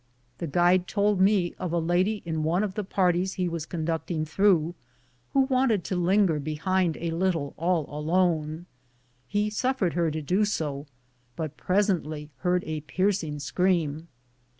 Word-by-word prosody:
The 170 - -3
guide 175 +4 +3
told 205 -2 +1
me 190 -3 +3
of 180 -3 -3
a 170 - +1
lady 180 +6 +1
in 160 -2 -2
one 170 +6 +1
of 200 -3 -2
the 210 - -3
par 185 -2 +2
ties 185 +2 -1
he 180 -1 -1
was 165 -2 -4
conducting 160 -1 -2
through, 175 -1 +2 0.6
who 275 - +5
wanted 255 -7 +2
to 185 - -3
linger 180 -2 +3
behind 160 +3 0
a 170 0 -3
little 165 -4 -1
all 170 -1 0
alone; 160 +1 0 0.6
he 210 +1 0
suffered 225 -5 0
her 170 -1 +1
to 155 0 -3
do 185 +8 +2
so, 150 -8 -2 0.5
but 155 -2 -4
presently 160 -4 0
heard 180 +5 +1
a 155 -1 -3
piercing 180 -1 -1
scream. 160 0 0
175 Hz, 155 wpm, -27 LUFS, 155-190 Hz, 0.6 s, who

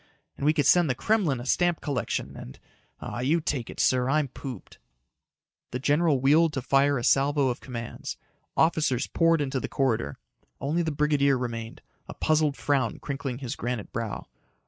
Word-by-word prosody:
And 140 - -2
we 155 - +5
could 150 -3 +1
send 175 -4 +5
the 125 - +1
Kremlin 180 - +1
a 120 - -7
stamp 175 +4 +2
collection 140 -3 -3
and.... 65 - -10 0.4
Aw, - - -5
you 145 +7 +2
take 140 -6 -3
it, - - -9
sir. 125 0 +2
I'm 150 -1 +1
pooped." 125 -5 -9 0.9
The 125 - -3
general 145 +2 +2
wheeled 150 +4 +4
to 135 -3 -3
fire 140 +1 +3
a 120 - -3
salvo 140 +1 +3
of 125 - -3
commands. 120 -3 -6 0.4
Officers 155 -6 +2
poured 165 -2 +2
into 135 -2 -1
the - - -5
corridor. 115 - 0 0.4
Only 155 +5 0
the 160 -2 -1
brigadier 145 -2 +2
remained, 115 -2 -5 0.2
a - - -8
puzzled 155 -2 +1
frown 135 -6 0
crinkling 135 -3 -4
his 130 -3 -5
granite 120 -3 -4
brow. 115 -3 -4
140 Hz, 170 wpm, -27 LUFS, 125-150 Hz, 0.9 s, we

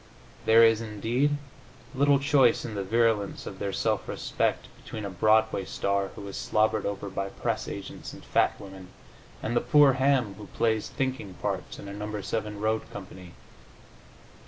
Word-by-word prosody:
There 115 +1 +7
is, 115 -1 +5
indeed, 115 +7 0 0.6
little 140 +1 +4
choice 135 -3 +3
in 115 - -5
the 100 -1 -2
virulence 110 0 +1
of 95 - -8
their 100 - -2
self 110 +1 -1
respect - - -1 0.2
between 110 -2 -6
a 100 - -4
Broadway 110 +2 +3
star 100 +1 -1
who 100 - -8
is 100 - -7
slobbered 110 0 +1
over 100 0 -4
by 100 0 -3
press - - -3
agents - - -7
and - - -12
fat - - +2
women, 95 -2 -10 0.6
and 120 - -1
the - - +3
poor 145 -3 +6
ham 130 -5 +2
who 105 - -9
plays 110 0 0
thinking 130 -8 -3
parts - - -4
in 100 - -9
a 100 - -6
No. 105 +1 -4
7 105 +1 -3
road 110 +1 -1
company. 90 -3 -10
110 Hz, 165 wpm, -27 LUFS, 100-115 Hz, 0.6 s, There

